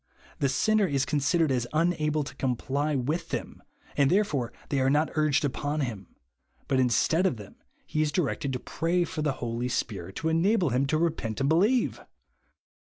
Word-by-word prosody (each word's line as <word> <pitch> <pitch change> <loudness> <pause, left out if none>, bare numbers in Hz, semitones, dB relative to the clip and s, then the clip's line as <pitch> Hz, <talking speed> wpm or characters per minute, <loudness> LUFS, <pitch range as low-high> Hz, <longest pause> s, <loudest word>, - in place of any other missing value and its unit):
The 140 - +2
sinner 215 +9 +2
is 140 -4 0
considered 150 +1 +1
as 120 -2 0
unible 155 -2 +1
to 130 - -9
comply 140 +3 -1
with 145 +6 -2
them, - - -5 0.3
and 140 -1 +3
therefore 150 - +1 0.2
they 140 - +1
are 130 0 +3
not 150 +3 +2
urged 150 -2 +2
upon, 145 +2 -2
him; 110 -8 -5 0.5
but 135 -1 +1
instead 130 - +3
of 160 - -2
them, 105 -2 -12 0.3
he 155 - -1
is 155 -1 +1
directed 145 -5 -1
to 125 - -2
pray 170 +6 0
for 160 - -4
the 150 -2 +1
Holy 120 0 -3
Spirit 95 -7 -3
to 160 - -1
enable 175 - +2
him 130 +3 +1
to 155 - +1
repent 155 -10 -1
and 135 +1 +1
believe 205 +10 +2
145 Hz, 180 wpm, -27 LUFS, 130-165 Hz, 0.5 s, and